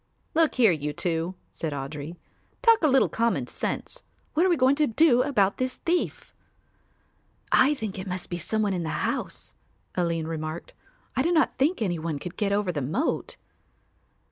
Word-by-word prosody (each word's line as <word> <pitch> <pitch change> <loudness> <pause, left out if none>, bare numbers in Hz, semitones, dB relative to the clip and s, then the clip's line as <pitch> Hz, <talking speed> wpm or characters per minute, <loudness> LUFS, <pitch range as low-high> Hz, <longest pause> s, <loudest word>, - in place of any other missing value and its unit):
"Look 320 -1 +3
here, 230 -6 +5
you 150 -2 -2
two," 170 +2 -2 0.2
said 160 -3 -4
Audry, 145 +3 -5 0.5
"talk 460 -2 +6
a 315 - +4
little 270 -2 +4
common 225 - 0
sense. - - -4 0.3
What 320 - +3
are - - +2
we 345 - +3
going 260 +1 +5
to 305 -1 +3
do 250 +1 +4
about 215 -8 +2
this 255 0 -1
thief?" 345 +1 -2 1.2
"I 280 +3 +5
think 215 -7 -5
it 185 - -6
must 180 0 -3
be 175 - -2
some 215 +6 0
one 200 -2 +1
in 180 - -1
the 160 - -2
house," - - -4 0.4
Aline 170 -2 0
remarked. 160 0 -5 0.4
"I - - +2
do 335 +6 +1
not 320 -2 +3
think 285 -1 +2
any 175 -5 -1
one 160 -2 -3
could 175 +5 -7
get 205 -2 0
over 200 -2 +1
the 150 -4 -3
moat." 160 - -1
200 Hz, 180 wpm, -26 LUFS, 165-270 Hz, 1.2 s, talk